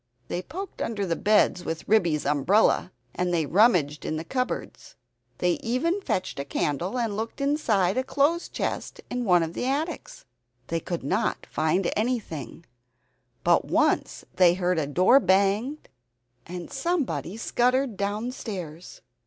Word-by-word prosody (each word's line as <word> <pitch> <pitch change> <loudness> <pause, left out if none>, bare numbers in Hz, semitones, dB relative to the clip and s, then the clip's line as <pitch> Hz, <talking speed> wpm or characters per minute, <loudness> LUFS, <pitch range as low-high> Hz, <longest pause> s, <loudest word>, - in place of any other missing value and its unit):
They 175 - -2
poked 375 - -7
under 205 -3 -2
the 170 -2 0
beds 205 -2 +3
with 165 -2 -5
Ribby's 170 -8 +2
umbrella 160 +7 +3 0.2
and 180 0 -1
they 165 -3 +1
rummaged 170 - +3
in 155 - -2
cupboards. 255 +8 -4 0.4
They 180 -1 +1
even 330 - 0
fetched 185 - -2
a - - -1
candle 155 - -2
and 230 -4 -1
looked 225 +5 -4
inside 240 - +1
a - - 0
clothes 290 +6 +1
chest - - -4
in 245 -1 -2
one 180 -4 +4
of 165 0 -4
the 250 - -2
attics. 300 +5 -3 0.4
They 165 - 0
could 170 -1 -4
not 190 +11 -1
find 160 +4 +1
anything, 200 - -3 0.8
but - - +3
once - - +1
they 175 -2 +6
heard 180 -2 +1
a 145 - -1
door 185 - +5
bang 200 +7 +2 0.7
and 175 0 -7
somebody 270 - -1
scuttered 250 +1 +1
downstairs. 200 - -5
195 Hz, 140 wpm, -26 LUFS, 170-250 Hz, 0.8 s, they